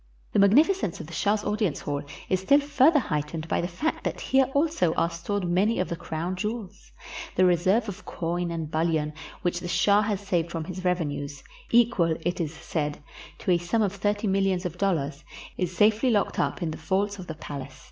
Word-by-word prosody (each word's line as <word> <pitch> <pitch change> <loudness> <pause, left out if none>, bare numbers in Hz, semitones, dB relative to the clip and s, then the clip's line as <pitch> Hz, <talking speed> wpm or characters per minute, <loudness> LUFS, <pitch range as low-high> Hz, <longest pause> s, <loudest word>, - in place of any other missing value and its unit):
The - - +3
magnificence 260 - +4
of - - -6
the 170 - -11
shah's 205 +4 +1
audience 205 -6 -1
hall 145 -1 -2 0.3
is 185 - +1
still 275 +10 +5
further 290 +2 +4
heightened 155 - -2
by - - 0
the 175 - -1
fact 240 - -2
that - - -2
here 265 0 +3
also 285 - +2
are 170 - +1
stored 180 +3 -3
many 195 +6 +2
of 185 - -1
the 170 - -2
crown 165 +3 -4
jewels. 210 0 -5 0.4
The 185 - +5
reserve 185 +6 +3
of 200 - -7
coin 175 +1 -2
and 165 -2 -4
bul 160 +1 +1
lion 155 -2 0 0.3
which 175 0 0
the 175 - -6
shah 200 +4 +4
has 210 -2 -1
saved 180 -5 -1
from 165 -1 -3
his 185 +2 -7
revenues, 145 -6 -2 0.3
equal, 220 -9 +3
it 175 +2 -1
is 155 -3 -2
said, 150 -2 -3 0.4
to - - -1
a 175 - +4
sum 175 +6 +1
of 200 -2 0
thirty 205 +2 -1
millions 195 -2 +1
of 175 0 -4
dollars, 150 -7 0 0.3
is 180 -1 -3
safely 220 +5 +4
locked 210 -4 +1
up - - 0
in 160 - -1
the - - -6
vaults 200 +4 -1
of 180 - -8
the 160 - -5
palace. 140 -3 -8
180 Hz, 205 wpm, -26 LUFS, 165-205 Hz, 0.4 s, still